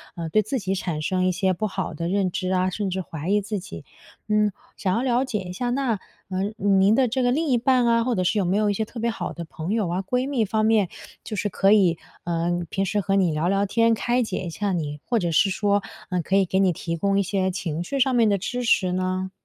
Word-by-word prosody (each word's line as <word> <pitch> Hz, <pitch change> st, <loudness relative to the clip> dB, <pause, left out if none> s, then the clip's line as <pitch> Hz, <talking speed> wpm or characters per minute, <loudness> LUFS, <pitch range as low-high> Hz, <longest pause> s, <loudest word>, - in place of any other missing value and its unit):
呃， 165 Hz, -2 st, -4 dB
对 215 Hz, +7 st, +3 dB
自 215 Hz, +6 st, -2 dB
己 190 Hz, -2 st, -2 dB
产 170 Hz, -5 st, -3 dB
生 185 Hz, +4 st, 0 dB
一 185 Hz, -, +3 dB
些 190 Hz, +1 st, +1 dB
不 215 Hz, +5 st, -2 dB
好 190 Hz, -3 st, -4 dB
的 165 Hz, +2 st, -3 dB
认 190 Hz, +1 st, +1 dB
知 185 Hz, +1 st, -2 dB
啊， 185 Hz, 0 st, +2 dB
甚 200 Hz, +1 st, -2 dB
至 190 Hz, +1 st, -2 dB
怀 160 Hz, 0 st, -6 dB
疑 205 Hz, +1 st, +4 dB
自 210 Hz, 0 st, -3 dB
己。 85 Hz, -, -9 dB, 0.4 s
嗯， 210 Hz, -1 st, +2 dB, 0.3 s
想 185 Hz, -2 st, 0 dB
要 230 Hz, -, +1 dB
了 250 Hz, -1 st, +2 dB
解 225 Hz, -5 st, -2 dB
一 180 Hz, -2 st, -6 dB
下， 245 Hz, +6 st, -2 dB
那， 255 Hz, -3 st, 0 dB, 0.3 s
呃， 185 Hz, 0 st, -1 dB
您 195 Hz, 0 st, +4 dB
的 260 Hz, 0 st, +3 dB
这 255 Hz, +3 st, 0 dB
个 245 Hz, -, +3 dB
另 315 Hz, +5 st, 0 dB
一 255 Hz, -4 st, +3 dB
半 250 Hz, 0 st, +3 dB
啊， 230 Hz, 0 st, +3 dB
或 250 Hz, +1 st, 0 dB
者 185 Hz, -, 0 dB
是 180 Hz, -, +1 dB
有 200 Hz, -, +2 dB
没 180 Hz, +2 st, +1 dB
有 210 Hz, -1 st, +2 dB
一 -, -, +1 dB
些 220 Hz, +2 st, -1 dB
特 230 Hz, -, -9 dB
别 235 Hz, +1 st, 0 dB
好 195 Hz, -6 st, -4 dB
的 170 Hz, -, -6 dB
朋 160 Hz, +3 st, -6 dB
友 220 Hz, -4 st, +1 dB
啊、 180 Hz, +2 st, -1 dB
闺 250 Hz, +6 st, -1 dB
蜜 260 Hz, -6 st, +1 dB
方 215 Hz, +2 st, 0 dB
面， 215 Hz, -4 st, +3 dB, 0.3 s
就 215 Hz, -, -5 dB
是 205 Hz, -, -1 dB
可 195 Hz, +1 st, +3 dB
以， 185 Hz, -6 st, +4 dB, 0.3 s
呃， 170 Hz, 0 st, 0 dB
平 195 Hz, -, -1 dB
时 205 Hz, +2 st, 0 dB
和 195 Hz, 0 st, 0 dB
你 185 Hz, -4 st, +3 dB
聊 155 Hz, +2 st, 0 dB
聊 195 Hz, +1 st, +2 dB
天， 230 Hz, +3 st, +3 dB
开 240 Hz, +3 st, +1 dB
解 220 Hz, -4 st, -3 dB
一 175 Hz, -, -4 dB
下 200 Hz, +4 st, -2 dB
你， 150 Hz, -4 st, -3 dB
或 240 Hz, -, +1 dB
者 175 Hz, -4 st, -1 dB
是 180 Hz, +5 st, +4 dB
说， 205 Hz, +1 st, +1 dB, 0.3 s
呃， 180 Hz, -2 st, 0 dB
可 190 Hz, +4 st, -1 dB
以 195 Hz, -1 st, +4 dB
给 190 Hz, +1 st, 0 dB
你 190 Hz, -2 st, +4 dB
提 165 Hz, +1 st, -4 dB
供 200 Hz, +3 st, +1 dB
一 -, -, +2 dB
些 190 Hz, 0 st, 0 dB
情绪 175 Hz, -, -3 dB
上 265 Hz, 0 st, +3 dB
面 230 Hz, -3 st, +4 dB
的 200 Hz, -, +2 dB
支 245 Hz, +6 st, -3 dB
持 190 Hz, -6 st, +3 dB
呢？ 185 Hz, +1 st, -2 dB
195 Hz, 290 characters per minute, -24 LUFS, 180-220 Hz, 0.4 s, 疑